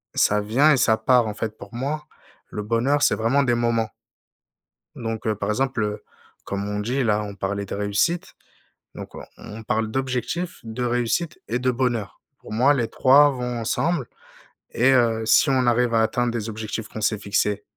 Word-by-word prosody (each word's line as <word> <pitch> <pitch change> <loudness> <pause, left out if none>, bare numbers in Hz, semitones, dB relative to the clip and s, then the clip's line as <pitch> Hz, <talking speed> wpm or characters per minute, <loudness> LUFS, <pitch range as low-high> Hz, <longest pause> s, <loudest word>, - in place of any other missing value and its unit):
ça 105 0 +3
vient 130 +9 +3
et 145 - +4
ça 110 -3 +3
part, 125 -3 +3
en 105 - -4
fait, 110 -1 -4
pour 115 - -11
moi, 145 +5 -3 0.4
le 105 - -5
bonheur, 120 +7 +1
c'est - - +4
vraiment 120 +6 +2
des 125 -3 +2
moments. 115 -2 0 1.1
Donc 115 -1 -5
heu, 110 - +1
par 105 - -3
exemple, 130 0 0
heu, 105 0 -4 0.4
comme 100 +1 -4
on 105 0 -3
dit 125 +6 -1
là 105 -2 +1
on 100 -1 -7
parlait 100 +1 -3
de 100 - -5
réussite, 105 +13 -1 0.6
donc - - -9
on - - -8
on 110 +2 -10
parle 110 -1 -1
d'objectifs, 130 +8 -3
de 115 +2 -5
réussite 120 +7 -1
et 120 +3 -1
de 130 0 +1
bonheur. 120 -6 -2 0.2
Pour - - -13
moi, 130 +6 +4
les 120 -5 0
3 140 +3 +5
vont 125 -2 -4
ensemble 145 +4 -1 0.7
et 125 +3 +4
heu, 115 -3 +2
si 115 - +4
on 130 -2 +2
arrive 120 0 +2
à 115 - +4
atteindre 120 +2 0
des 115 -1 -4
objectifs 110 0 -5
qu'on 110 - -8
s'est 110 0 +1
fixés, 100 0 -1
115 Hz, 190 wpm, -23 LUFS, 110-130 Hz, 1.1 s, 3